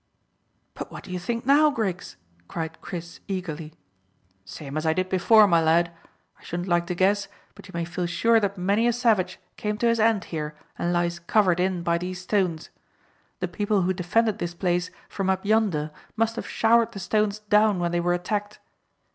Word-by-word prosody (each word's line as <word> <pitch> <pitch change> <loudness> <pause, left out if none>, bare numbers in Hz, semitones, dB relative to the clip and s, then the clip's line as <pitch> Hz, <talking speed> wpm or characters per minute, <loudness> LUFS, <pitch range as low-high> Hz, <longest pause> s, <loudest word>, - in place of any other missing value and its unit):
"But - - -7
what - - -9
do 195 - -10
you 180 - -3
think 230 +6 -3
now, 290 +3 +6
Griggs?" 195 - -3 0.3
cried 165 -1 -5
Chris 170 -2 -7
eagerly. 165 -5 -5 0.7
"Same 140 +9 -8
as 155 - -1
I 160 -1 +2
did 185 +2 -1
before, 210 +4 +6
my 170 -4 +4
lad. 170 +1 +3 0.5
I - - -21
shouldn't 175 +2 -4
like 175 -1 +1
to 180 - -2
guess, 195 +3 +2 0.3
but - - -14
you - - -12
may 170 0 -1
feel 175 +1 -3
sure 225 +6 +3
that 200 -1 -2
many 200 +6 +2
a 240 - +3
savage 220 -7 +1 0.2
came 210 0 -2
to 235 - -1
his 230 0 +2
end 220 -2 +3
here 150 -1 -3 0.2
and 175 - -1
lies 175 0 0
covered 180 -1 +2
in 180 -1 0
by 170 0 +1
these 180 +1 -5
stones. 180 -4 -1 0.7
The - - 0
people 205 -2 0
who 185 +1 +1
defended 210 +4 +1
this 175 -2 -4
place 175 0 0 0.2
from 195 -1 -2
up 190 +1 0
yonder 200 -9 +1 0.2
must 225 0 +1
have - - -5
showered 230 0 +3
the 195 - -6
stones 210 +2 0
down 210 -1 +3
when 175 -1 -1
they 175 - +1
were 175 +1 +1
attacked. 205 +3 -3
185 Hz, 195 wpm, -25 LUFS, 175-210 Hz, 0.7 s, now